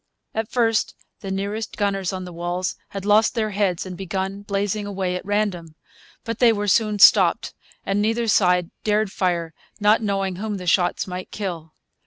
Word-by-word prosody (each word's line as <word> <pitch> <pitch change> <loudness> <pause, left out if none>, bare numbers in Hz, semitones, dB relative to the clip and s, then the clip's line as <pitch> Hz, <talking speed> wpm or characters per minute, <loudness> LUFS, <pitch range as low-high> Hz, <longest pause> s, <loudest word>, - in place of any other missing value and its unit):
At 220 0 -2
first 225 -3 +1 0.2
the 195 - -7
nearest 200 +3 -3
gunners 195 -3 0
on 185 -1 -5
the 180 - -9
walls 175 +2 -3
had 195 -1 -6
lost 215 +3 +4
their 215 -2 0
heads 195 -4 0
and 185 -1 -7
begun 190 +2 -4
blazing 205 0 -2
away 190 -2 -2
at 180 - -4
random. 195 -6 -2 0.5
But 230 -1 -4
they 240 -2 +6
were 205 -1 -2
soon 210 +1 +2
stopped; 195 - +5 0.3
and 195 +1 0
neither 225 +2 0
side 180 -4 +3
dared 210 -1 +1
fire, 170 -4 -1 0.3
not 210 +2 +4
knowing 195 -3 -1
whom 210 +1 -3
the 180 - -7
shots 175 0 +2
might 185 0 -6
kill. 170 -6 -6
195 Hz, 175 wpm, -22 LUFS, 180-210 Hz, 0.5 s, they